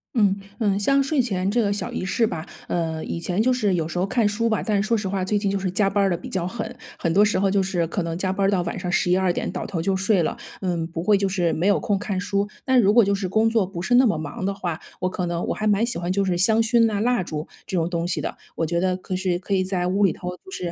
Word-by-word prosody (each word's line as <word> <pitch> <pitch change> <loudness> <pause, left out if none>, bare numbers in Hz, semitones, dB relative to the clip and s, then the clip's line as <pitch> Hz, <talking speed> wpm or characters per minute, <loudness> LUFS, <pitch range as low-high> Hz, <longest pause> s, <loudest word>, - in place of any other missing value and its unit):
嗯， 205 -4 +4 0.2
嗯， 200 -3 +1
像 275 +7 +3
睡 275 +1 0
前 195 -6 0
这 240 +3 +1
个 200 -1 +1
小 205 - -4
仪 - - -3
式 225 +4 +1
吧， 160 -5 -5 0.2
呃， 160 -2 -2
以 170 - -4
前 180 +4 -1
就 255 +3 +3
是 215 -6 +1
有 165 -2 0
时 175 - -5
候 180 - +2
看 220 +2 +1
书 230 +3 0
吧， 220 - +1
但 215 -2 0
是 215 - -2
说 230 - +2
实 205 -3 -2
话 190 -1 -1
最 205 +2 +1
近 200 -1 0
就 200 - 0
是 190 -2 -2
加 195 +1 +2
班 200 0 +1
儿 195 - +3
地 175 - +1
比 170 - -8
较 180 -2 -2
狠， 220 +4 -5 0.2
很 165 - 0
多 205 +4 +5
时 210 - +1
候 195 0 +2
就 195 0 +2
是 175 -3 -1
可 180 +2 -2
能 165 0 -3
加 185 +2 -1
班 195 0 0
儿 - - +2
到 185 -3 +2
晚 170 - -4
上 180 - -3
11-12 180 0 +2
点， - - -3
倒 - - -4
头 170 -5 -3
就 195 +2 +1
睡 195 -1 +2
了。 155 - -1 0.2
嗯， 175 -3 -1
不 165 0 -5
会 205 +2 +4
就 195 0 +1
是 180 -3 +1
没 170 - -1
有 205 - +4
空 205 -2 0
看 195 -2 -3
书， 200 +2 -1 0.2
但 260 -1 +4
如 205 -3 +4
果 235 0 +7
就 200 0 +2
是 195 -1 -2
工 220 +4 +2
作 225 -4 +2
不 180 -2 -6
是 245 +6 +2
那 260 - +6
么 215 - +2
忙 155 +4 -5
的 200 - 0
话， 175 -4 -4 0.2
我 185 0 0
可 180 0 -3
能 170 0 -2
我 - - -1
还 215 - -3
蛮 210 +1 +3
喜 235 -6 -1
欢 175 +1 -2
就 200 +1 +1
是 180 -2 0
香 220 +5 +4
薰 230 0 +4
呐、 210 -2 0
蜡 240 -3 +2
烛 155 -2 -5 0.2
这 - - -4
种 165 -1 +1
东 170 -1 -1
西 175 - -1
的， - - -4 0.2
我 165 - 0
觉 170 +1 0
得 185 0 +1
可 185 0 -5
是 185 -1 0
可 195 +2 -1
以 185 - +2
在 185 -1 -1
屋 200 +2 +3
里 180 - +2
头 180 - -6
就 380 - -16
是 175 - -4
195 Hz, 335 characters per minute, -23 LUFS, 180-210 Hz, 0.2 s, 果